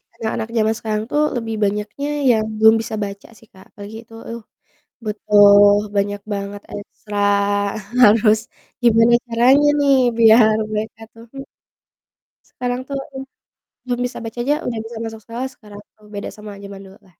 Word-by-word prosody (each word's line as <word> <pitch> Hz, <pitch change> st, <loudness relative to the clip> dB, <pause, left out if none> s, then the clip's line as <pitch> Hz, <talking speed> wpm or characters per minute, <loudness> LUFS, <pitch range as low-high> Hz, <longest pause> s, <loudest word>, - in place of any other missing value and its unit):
anak-anak 225 Hz, 0 st, -4 dB
zaman 220 Hz, 0 st, +2 dB
sekarang 215 Hz, -1 st, -3 dB
tuh 295 Hz, -, +1 dB
lebih 225 Hz, -2 st, -3 dB
banyaknya 210 Hz, +7 st, -2 dB, 0.2 s
yang 220 Hz, -1 st, +1 dB
belum 220 Hz, +1 st, +6 dB
bisa 220 Hz, -, -6 dB
baca 200 Hz, 0 st, -8 dB
sih 225 Hz, -, -21 dB
Kak, 190 Hz, -, -16 dB
apalagi 205 Hz, +1 st, -11 dB
itu, 225 Hz, -, -19 dB, 0.2 s
uh, -, -, -12 dB, 0.7 s
betul 205 Hz, -1 st, +5 dB, 0.2 s
banyak 205 Hz, 0 st, -1 dB
banget 200 Hz, 0 st, -5 dB
ekstra 205 Hz, 0 st, -9 dB, 0.9 s
harus 215 Hz, 0 st, +5 dB, 0.4 s
gimana 235 Hz, 0 st, +4 dB
caranya 250 Hz, +5 st, +3 dB
nih 280 Hz, -1 st, +4 dB, 0.2 s
biar 220 Hz, -1 st, +6 dB, 0.2 s
mereka 215 Hz, +1 st, -4 dB
tuh 230 Hz, 0 st, -14 dB
hmm 275 Hz, 0 st, -9 dB, 1.0 s
sekarang 245 Hz, 0 st, -4 dB
tuh 280 Hz, -, -5 dB, 0.2 s
hmm, 265 Hz, 0 st, -7 dB, 0.6 s
belum 245 Hz, -1 st, -3 dB
bisa 245 Hz, -, -6 dB
baca 225 Hz, +1 st, -7 dB
aja 285 Hz, +5 st, +1 dB
udah 230 Hz, -2 st, -3 dB
bisa 230 Hz, 0 st, -9 dB
masuk 225 Hz, -1 st, -7 dB
sekolah 250 Hz, +3 st, -6 dB
sekarang 210 Hz, -2 st, -13 dB, 0.4 s
beda 200 Hz, -, -5 dB
sama 210 Hz, -1 st, -11 dB
jaman 200 Hz, 0 st, -10 dB
dulu 190 Hz, 0 st, -15 dB
lah. -, -, -26 dB
220 Hz, 155 wpm, -19 LUFS, 205-235 Hz, 1.0 s, belum